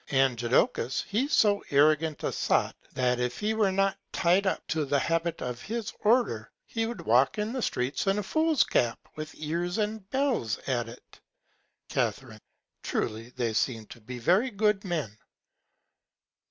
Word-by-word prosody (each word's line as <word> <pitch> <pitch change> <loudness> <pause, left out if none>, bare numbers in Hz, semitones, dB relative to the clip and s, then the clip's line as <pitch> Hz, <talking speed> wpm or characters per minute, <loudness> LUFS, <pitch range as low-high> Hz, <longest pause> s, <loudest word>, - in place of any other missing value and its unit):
And 135 -2 +3
Jodocus 120 +1 +1
he's 255 +9 0
so 205 -5 +4
arrant 150 +2 +3
a - - 0
Sot, - - +1 0.2
that 125 -1 +1
if 125 0 -1
he 215 +1 0
were 215 -3 +2
not 195 0 +1
ty'd 185 +3 +2
up - - -1
to 160 -1 0
the 145 0 +1
Habit 165 +3 -1
of 125 -1 -4
his 230 - -4
Order, 210 - +2 0.2
he 225 -1 -2
would 235 - -5
walk 125 +4 +3
the 220 +5 -2
Streets 130 - -1
in 195 +1 +3
a 210 - -1
Fool's 315 +6 +2
Cap 120 -2 +1 0.2
with 155 0 -7
Ears 170 +4 -2
and 210 -2 -2
Bells 260 - 0
at 120 -3 -1
it. 120 - -15 0.7
Ca. - - +2 0.7
Truly 110 +2 -3
they 120 -3 -2
seem 115 0 0
to 120 - -12
me 105 - -28
to - - -31
be 125 - -5
very 185 - +3
good 210 -2 +1
Men. 155 - -3
165 Hz, 165 wpm, -28 LUFS, -, 0.7 s, so